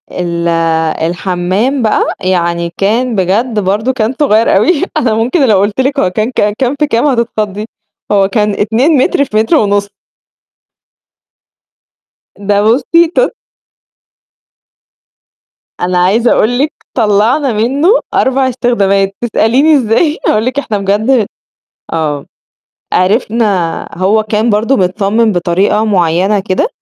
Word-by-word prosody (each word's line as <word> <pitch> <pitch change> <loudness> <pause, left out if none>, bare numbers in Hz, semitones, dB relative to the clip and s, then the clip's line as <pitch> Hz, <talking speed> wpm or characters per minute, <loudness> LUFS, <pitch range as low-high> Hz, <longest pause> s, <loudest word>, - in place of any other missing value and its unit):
ال 170 -1 -3 0.6
الحمّام 185 +9 -1
بقى 220 -2 +1 0.2
يعني 170 -2 -1
كان 230 +4 0
بجد 210 +5 0
برضه 210 +6 -1
كان 230 -1 -1
صغير 230 -6 +2
أوي 280 - +2 0.2
أنا 230 -3 +1
ممكن 255 +6 +1
لو 210 -4 +3
قلت 205 +5 0
لِك 275 +2 -1
هو 185 - +1
كان 215 +6 -2
ك 210 -4 0
كام 265 +1 0
في 300 - +1
كام 235 0 0
هتتخضي 215 -6 -1 0.5
هو 200 -2 +3
كان 210 0 0
2 225 +9 +1
متر 280 +2 +1
في 215 - -3
متر 225 +9 +2
ونُص. 205 -5 0 2.5
ده 205 0 0
بُصّي 285 +9 +3
ت - - +2 2.5
أنا 180 0 -1
عايزة 205 +7 +2
أقول 245 +3 +1
لِك 295 +3 0 0.2
طلّعنا 230 +5 +1
منه 265 - +1 0.2
4 265 0 +1
استخدامات، 200 -6 0
تسأليني 245 +6 +2
إزاي 270 +6 +1
أقول 215 +1 +1
لِك 255 +3 -1
إحنا 225 -7 -3
بجد 210 +4 +1 0.7
آه، 150 -3 -2 0.7
عرفنا 200 -3 0
هو 195 +5 +1
كان 215 +2 -1
برضه 220 +6 +1
متصمم 205 +3 +1
بطريقة 185 +4 0
معينة 190 0 +1
كده، 190 - -1
215 Hz, 125 wpm, -12 LUFS, 195-250 Hz, 2.5 s, لو